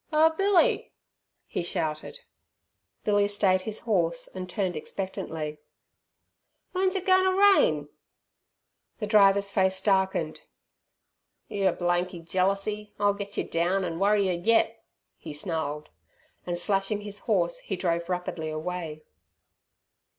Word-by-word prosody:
"Oh, 315 +1 +5
Billy!" 390 -1 +3 0.5
he - - -3
shouted. 160 - -3 0.8
Billy 205 -1 +3
stayed 195 -2 +2
his 215 +2 -5
horse 170 -7 0
and 185 -1 -6
turned 185 -2 -1
expectantly. 155 -3 -5 1.1
"W'en's 375 +1 +1
it 380 -1 -2
goin' 375 -1 +5
ter 375 0 +2
rain?" 405 +5 +5 1.1
The 215 - -3
driver's 200 -1 +4
face 190 -1 +2
darkened. 190 -5 0 1.1
"Your 195 -2 +1
blanky 175 0 -1
jealersey 195 +5 -1
'll 205 0 +3
get 200 0 -7
yer - - +1
down, 180 +3 0
an' 165 -1 -4
worry 200 0 +3
yer 185 - +1
yet," 225 0 +2 0.4
he 155 - -8
snarled, 150 -2 -4 0.6
and 175 -1 -1
slashing 195 +2 0
his 205 0 -6
horse 175 -6 0
he 195 - -4
drove 170 -1 -1
rapidly 180 -3 -3
away. 155 -1 -5
190 Hz, 120 wpm, -27 LUFS, 170-210 Hz, 1.1 s, Oh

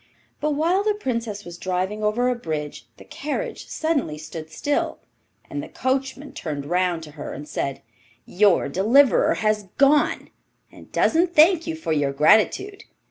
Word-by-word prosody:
But 300 -1 0
while 345 +6 +2
the 425 0 +1
Princess 230 - -4
was 175 0 -9
driving 185 +3 -2
over 220 +4 +1
a 250 - +2
bridge 155 -10 -5
the - - -14
carriage 445 - -5
suddenly 285 - -1
stood 155 +1 -8
still, 290 - -1 0.5
and 290 - -4
the 305 - -9
coachman 270 +2 -2
turned 145 - -5
round 175 0 0
to 150 - -10
her 145 -1 -7
and 150 - -8
said, 140 -2 -4 0.4
'Your 200 -1 +3
deliverer 225 - +4
has 215 -2 0
gone, 285 +2 +3 0.4
and - - -16
doesn't 345 +2 +2
thank 330 +2 +5
you 325 - -2
for 320 - -4
your 145 -2 0
gratitude. 215 - +3
215 Hz, 155 wpm, -23 LUFS, -, 0.5 s, thank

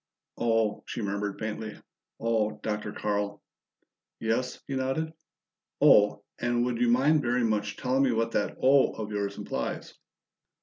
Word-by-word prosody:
"Oh!" 115 -2 +1
she 115 - -4
murmured 100 0 -2
faintly. 110 0 -5 0.4
"Oh, 110 -2 0
Dr. 105 -1 -2
Carl!" 105 -1 -2 0.8
"Yes," 115 +3 -1
he 135 - -4
nodded. 135 +5 -1 0.7
"'Oh!' 105 0 +5 0.2
and 120 0 +1
would 120 -1 -2
you 120 - +4
mind 140 +6 +4
very 120 -1 +1
much 105 -2 0
telling 130 +1 +1
me 135 -2 +3
what 115 0 0
that - - -1
'Oh' 135 +1 +5
of 105 -1 -5
yours 100 -1 -2
implies?" - - -4
115 Hz, 140 wpm, -28 LUFS, 105-125 Hz, 0.8 s, Oh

